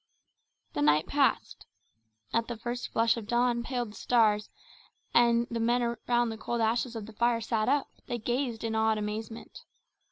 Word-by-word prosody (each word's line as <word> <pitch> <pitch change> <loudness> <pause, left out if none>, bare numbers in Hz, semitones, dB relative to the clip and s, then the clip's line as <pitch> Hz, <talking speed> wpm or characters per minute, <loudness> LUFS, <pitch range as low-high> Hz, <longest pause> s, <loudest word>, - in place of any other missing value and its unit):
The 145 - -2
night 150 +1 +4
passed. 280 -1 0 0.7
As 230 0 +2
the 240 -1 -5
first 240 +2 -4
flush 230 +1 +2
of 220 -3 -6
dawn 240 0 +2
paled 240 -2 -3
the - - -14
stars, 215 -3 +2 0.6
and 235 0 +4
the 235 - -2
men 240 +2 +2
around 240 0 0
the 220 -1 -6
cold 235 +1 -2
ashes 230 +2 0
of 220 -2 -5
the 220 - -12
fire 235 +1 +2
sat 220 0 0
up, 285 0 +2 0.2
they 240 - -2
gazed 240 0 -2
in 225 -1 -2
awed 220 0 +2
amazement. 215 +2 -5
230 Hz, 170 wpm, -29 LUFS, 220-240 Hz, 0.7 s, night